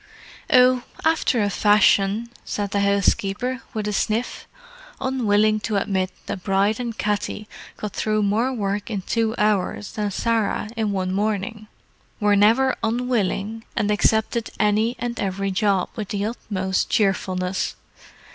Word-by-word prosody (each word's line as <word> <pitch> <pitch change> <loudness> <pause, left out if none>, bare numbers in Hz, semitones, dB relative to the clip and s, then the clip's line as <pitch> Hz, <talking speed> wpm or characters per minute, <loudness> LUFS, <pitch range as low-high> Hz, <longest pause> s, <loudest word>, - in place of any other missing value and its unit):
"Oh, 255 0 +6 0.2
after 315 -8 +2
a 205 - +1
fashion," 205 +2 +3
said 205 -1 -3
the 200 - +1
housekeeper, 200 +5 +1
with 215 -1 -2
a 210 - -1
sniff—unwilling 250 - -1
to 210 0 -3
admit 190 -2 0 0.2
that 185 - -5
Bride 200 +3 +1
and 235 -2 -4
Katty 210 0 -2 0.3
got 210 -2 -5
through 215 -1 0
more 220 +6 +1
work 205 -3 -2
in 200 -4 -3
two 225 +1 0
hours 210 -1 0
than 210 -1 -2
Sarah 220 0 0
in 215 -3 -1
a 190 -1 -1
morning, 210 +3 -2 0.5
were 205 -2 +3
never 230 +6 +4
unwilling, 225 -2 -1
and 210 0 +1
accepted 220 +2 +1
any 215 +3 +2
and 240 0 -4
every 195 0 -1
job 195 -1 +1
with 215 -3 -4
the 205 0 -1
utmost 190 -4 -2
cheerfulness. 190 -2 0
210 Hz, 135 wpm, -23 LUFS, 200-230 Hz, 0.5 s, Oh